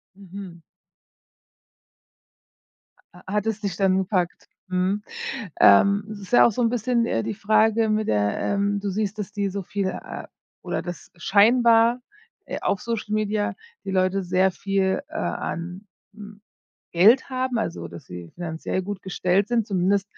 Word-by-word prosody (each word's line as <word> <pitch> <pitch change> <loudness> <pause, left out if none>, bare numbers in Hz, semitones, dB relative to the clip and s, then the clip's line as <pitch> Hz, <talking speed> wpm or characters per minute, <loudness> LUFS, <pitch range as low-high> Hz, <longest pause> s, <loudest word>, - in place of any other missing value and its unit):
Mhm. 190 -3 -10 2.5
Ah, 180 - -16
hat 210 0 0
es 220 -2 -1
dich 200 -4 -3
dann 190 0 +2
gepackt? 185 -2 -1 0.2
Mhm. 185 +3 0 0.6
Ähm, 200 - +6
es 210 - -7
ist 195 +3 -11
ja - - +8
auch - - +4
so 235 - -2
‘n 230 - +3
bisschen, 235 0 +1
äh, 115 - -1
die - - -3
Frage 220 +1 +2
mit 215 0 0
der, 105 -1 +1
ähm 200 0 0
du 205 - -2
siehst, 210 +1 -2
dass 210 -1 -5
die 200 -1 -1
so 195 +1 -4
viele, 195 +1 -2
äh - - -8 0.3
oder - - -3
das 175 -3 -8
scheinbar, 230 +5 +4 0.4
äh, - - -5
auf 195 - 0
Social 225 -2 -3
Media 215 -1 0 0.3
die 195 - -3
Leute 190 +1 +1
sehr 185 +1 +2
viel, 195 0 0
äh, - - -17
an, 180 +4 -4 0.3
hm, 210 0 -12 0.5
Geld 215 +12 +5
haben, 255 -1 -1
also 85 - -3
dass 85 0 -11
sie 90 -1 -9
finanziell 170 +2 -3
gut 200 0 -6
gestellt 190 +1 0
sind, 235 -3 +1
zumindest 195 +1 +1
200 Hz, 160 wpm, -24 LUFS, 185-215 Hz, 2.5 s, ja